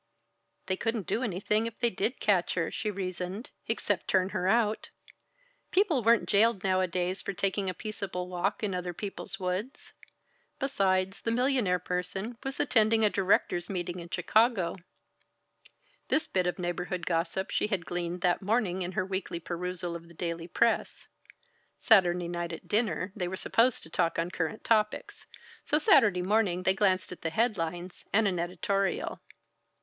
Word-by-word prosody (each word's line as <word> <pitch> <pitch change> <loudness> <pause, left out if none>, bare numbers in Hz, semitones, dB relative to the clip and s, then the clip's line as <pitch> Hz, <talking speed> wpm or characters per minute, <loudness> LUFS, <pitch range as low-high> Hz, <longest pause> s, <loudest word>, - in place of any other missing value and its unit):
They 190 - 0
couldn't 225 -4 -2
do 230 - -1
anything 210 0 0
if 230 - -8
they 235 -1 +2
did 205 +7 -1
catch 190 -4 +2
her, 170 -2 -1
she 215 - -2
reasoned, 185 +3 -5 0.2
except 205 -4 -1
turn 190 -1 +2
her 185 - -1
out. 220 0 +1 0.8
People 365 -9 +2
weren't 230 +1 +4
jailed 210 -1 +3
nowadays 185 -1 0
for 200 - -4
taking 195 +1 0
a 185 - -4
peaceable 195 -4 -5
walk 185 +4 -2
in 200 -3 0
other 180 -1 -3
people's 195 0 -5
woods. 185 +8 -4 0.6
Besides, 195 -7 0
the - - -2
millionaire 245 -6 +2
person 180 +5 -3
was 270 +1 -5
attending 225 -4 +4
a 210 - +3
directors' 185 -2 +1
meeting 180 -2 -3
in 170 0 -9
Chicago. 195 +1 +2 1.3
This 310 +1 +2
bit 185 -1 0
of 180 - -1
neighborhood 175 0 -3
gossip 170 +3 -1
she - - +1
had 195 -6 -2
gleaned 175 0 -3
that 175 -1 +2
morning 200 -3 0
in 180 +1 -3
her 185 - 0
weekly 190 -3 -3
perusal 175 0 -4
of 170 0 -9
the 170 - -16
daily 170 0 -4
press 230 +6 0 0.7
Saturday 180 -6 +4
night 175 0 -3
at 165 - -8
dinner 210 -3 0
they 180 -4 -2
were 190 +1 -4
supposed 235 +5 +2
to 160 - -12
talk 165 - +1
on 170 +1 -1
current 180 +5 -3
topics, 215 -2 0 0.4
so 300 - +2
Saturday 210 - +5
morning 190 -2 +1
they 190 - +3
glanced 190 -2 +1
at 180 - -9
the 165 - -1
headlines 175 -3 -2
and 220 +1 +4
an 180 -3 0
editorial. 195 +3 -1
190 Hz, 160 wpm, -29 LUFS, 180-215 Hz, 1.3 s, Saturday